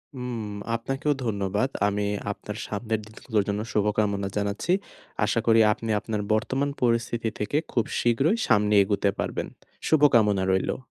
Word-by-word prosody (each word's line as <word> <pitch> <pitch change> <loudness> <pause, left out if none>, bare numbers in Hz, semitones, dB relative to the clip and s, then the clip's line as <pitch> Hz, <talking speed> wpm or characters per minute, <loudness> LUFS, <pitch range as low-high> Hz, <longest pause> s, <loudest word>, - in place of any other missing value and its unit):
হুম, 125 -2 -4 0.4
আপনাকেও 135 +5 -1
ধন্যবাদ। 105 +3 0 0.2
আমি, 105 0 -1 0.3
আপনার 105 +1 -7
সামনের 110 +1 -2
দিনগুলোর 110 -1 -2
জন্য 105 +1 -1
শুভকামনা 105 -1 +1
জানাচ্ছি। 100 - -1 0.5
আশা 115 - +1
করি 115 0 +6
আপনি 115 - -7
আপনার 105 0 -3
বর্তমান 135 +6 0
পরিস্থিতি 115 -1 +1
থেকে 105 +8 -1
খুব 120 -3 +1
শীঘ্রই 135 - +2
সামনে 105 -2 +3
এগুতে 100 0 +1
পারবেন। - - -2 0.4
শুভকামনা 115 -11 +4
রইলো। 95 0 0
110 Hz, 130 wpm, -26 LUFS, 105-120 Hz, 0.5 s, করি